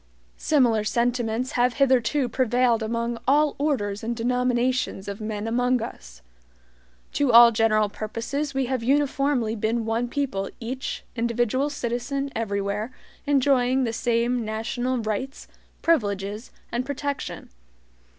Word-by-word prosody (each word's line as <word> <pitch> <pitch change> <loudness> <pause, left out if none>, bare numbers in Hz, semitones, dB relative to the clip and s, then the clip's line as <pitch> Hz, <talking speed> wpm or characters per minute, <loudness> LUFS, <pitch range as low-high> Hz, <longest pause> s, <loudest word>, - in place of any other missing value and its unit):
Similar 240 -8 +3
sentiments 240 +1 0
have 245 0 +1
hitherto 265 0 +2
prevailed 245 -1 +2
among 230 +1 -2
all 295 +2 +4
orders 210 -9 -1
and 235 +1 -2
denominations 250 -2 0
of 200 +1 -6
men 215 -1 -4
among 245 +2 +2
us. - - -9 0.9
To 285 -3 +2
all 235 0 +9
general 215 -1 +3
purposes 235 +8 -4
we 270 -1 +1
have 255 -1 -2
uniformly 275 -3 +1
been 225 +1 -1
one 225 +2 0
people 240 -8 -2
each 255 +3 -5
individual 240 +4 0
citizen 275 +1 -3
everywhere 205 +1 -2 0.4
enjoying 265 -2 +3
the 230 -2 -1
same 235 +1 0
national 235 +4 -2
rights, 230 +4 -4 0.4
privileges, 210 -7 0 0.2
and 240 +1 -1
protection. 285 - -4
240 Hz, 120 wpm, -25 LUFS, 220-260 Hz, 0.9 s, all